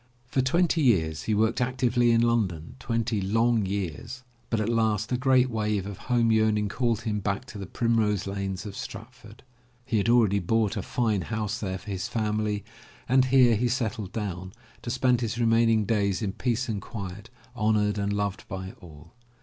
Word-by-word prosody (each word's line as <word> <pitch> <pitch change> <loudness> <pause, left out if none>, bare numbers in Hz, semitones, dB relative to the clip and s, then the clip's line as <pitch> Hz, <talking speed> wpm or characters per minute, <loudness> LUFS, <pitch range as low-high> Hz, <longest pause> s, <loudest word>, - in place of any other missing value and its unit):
For 130 +2 0
twenty 165 +4 +2
years 80 - +2
he 110 - +1
worked 110 +3 +1
actively 125 -1 +2
in 115 0 +4
London, 105 -9 0
twenty 115 -3 -1
long 115 +2 +2
years, 100 - -4 0.3
but 115 - 0
at 110 - -1
last 110 -2 +1
a - - +2
great 130 0 +3
wave 105 -4 -1
of 100 -1 -7
home 120 -2 +3
yearning 110 -2 +2
called 115 -1 0
him 105 -2 -2
back 100 0 -2
to 105 - -9
the 100 - -6
primrose 110 -3 +1
lanes 100 -1 -4
of 100 -2 -7
Stratford. 110 +2 -10 0.4
He 115 - 0
had 100 - 0
already 110 -4 +4
bought 110 +3 +1
a 105 - -2
fine 110 -2 0
house 110 +3 -3
there 95 -3 -3
for 105 +2 -9
his 95 -2 -3
family 105 -2 -1 0.4
and 130 +1 +4
here 125 -3 +5
he 120 +4 +1
settled 110 -6 -2
down, 95 -4 -5 0.3
to - - -6
spend 125 0 +2
his 115 -1 -2
remaining 115 -2 +3
years 100 -2 0
in 100 - -1
peace 120 +1 -1
and 105 -4 -3
quiet, 100 0 -7 0.3
honored 105 -2 +1
and 100 0 -1
loved 100 -1 -2
by 95 0 -6
all. 80 -1 -14
110 Hz, 180 wpm, -26 LUFS, 100-120 Hz, 0.4 s, here